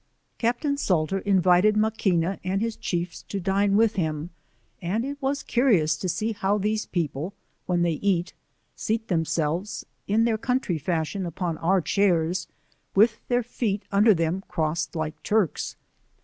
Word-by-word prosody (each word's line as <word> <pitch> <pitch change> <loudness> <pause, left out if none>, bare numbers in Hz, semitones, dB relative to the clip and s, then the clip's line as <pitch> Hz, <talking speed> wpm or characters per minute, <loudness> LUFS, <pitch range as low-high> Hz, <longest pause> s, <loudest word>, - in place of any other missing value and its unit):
Caj^tain 265 +5 0
Salter 180 - +1
invited 190 +1 +4
Maquina 195 -4 +1
and 185 +1 0
his 225 +1 -1
chiefs 175 0 -3
to 200 - -3
dine 195 +2 +2
with 225 -1 +3
him, 160 -1 -2 0.5
and 200 +7 -1
it 285 +1 -6
was 275 +1 -1
curious 200 - +3
to 185 +4 -3
see 215 +6 -1
how 200 -1 0
these 215 +1 -1
people 165 +1 -3 0.3
(when 175 -1 +2
they 170 - +2
eat) 185 -3 +1 0.4
seat 220 +1 -2
themselves 165 +2 -1 0.2
(in 215 +3 +3
their 225 -2 +1
country 250 -9 0
fashion, 170 +4 -1
upon 170 -1 -3
our 185 +3 +2
chairs) 175 -2 +1 0.5
with 215 +3 +5
their 245 0 +2
feet 220 -3 -2
under 210 +1 +5
them 165 +3 -1
crossed 160 -2 -1
like 155 -1 -3
Turks. 210 -7 0
195 Hz, 150 wpm, -25 LUFS, 170-215 Hz, 0.5 s, with